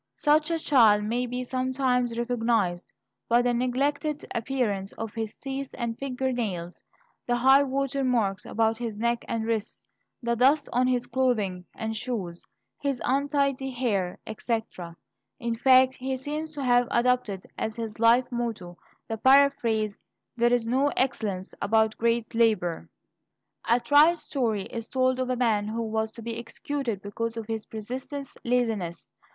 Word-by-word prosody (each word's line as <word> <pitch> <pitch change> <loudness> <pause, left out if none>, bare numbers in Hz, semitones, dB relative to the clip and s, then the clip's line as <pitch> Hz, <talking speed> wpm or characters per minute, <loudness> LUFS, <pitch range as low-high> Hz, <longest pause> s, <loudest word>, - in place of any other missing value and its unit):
Such 305 +1 +3
a 335 - +1
child 225 -10 +5
may 240 +4 -1
be 250 +1 -3
sometimes 255 -2 0
recognized 230 -7 0 0.4
by 240 +1 +4
the 245 0 +2
neglected 280 +5 -1
appearance 225 -6 -1
of 225 -2 -6
his 220 -2 -5
teeth 270 0 -5
and 235 -2 -2
finger 265 0 -2
nails, 185 -8 -4 0.5
the 240 - +2
"high 265 +3 +6
water 275 0 -1
marks" 220 -7 +1
about 225 0 0
his 230 -3 -4
neck 235 +1 0
and 225 -1 -2
wrists, 225 -2 -3 0.4
the 235 0 +1
dust 275 +5 +3
on 250 +1 +3
his 250 -1 +1
clothing 215 -10 0
and 220 0 -3
shoes, 205 -8 -4 0.4
his 275 -3 -1
untidy 275 0 +1
hair, 220 -8 -1
etc. 220 -6 -4 0.4
In 235 -1 -2
fact, 260 +2 +5
he 265 +1 -3
seems 300 +4 -4
to 285 -2 -4
have 245 -1 +3
adopted 235 -6 +1
as 220 - -3
his 225 -2 -6
life 235 +2 +5
motto 225 -8 -4 0.3
the 225 -1 -4
paraphrase, 240 -6 +3 0.4
"There 240 0 +3
is 245 -2 +2
no 260 +5 +2
excellence 210 -8 -1
about 220 +1 +2
great 235 0 0
labor." 215 -8 +1 0.8
A 235 +1 +5
trite 295 +6 +5
story 250 -9 -1
is 230 +2 -6
told 255 0 +1
of 255 0 -1
a 255 - +1
man 220 -4 +1
who 230 +2 -2
was 220 0 -1
to 230 - -10
be 230 0 -4
executed 235 -3 -4
because 230 +3 -4
of 225 - -4
his 220 -1 -4
persistent 260 +6 -6 0.2
laziness. 225 -8 -1
235 Hz, 155 wpm, -27 LUFS, 220-260 Hz, 0.8 s, high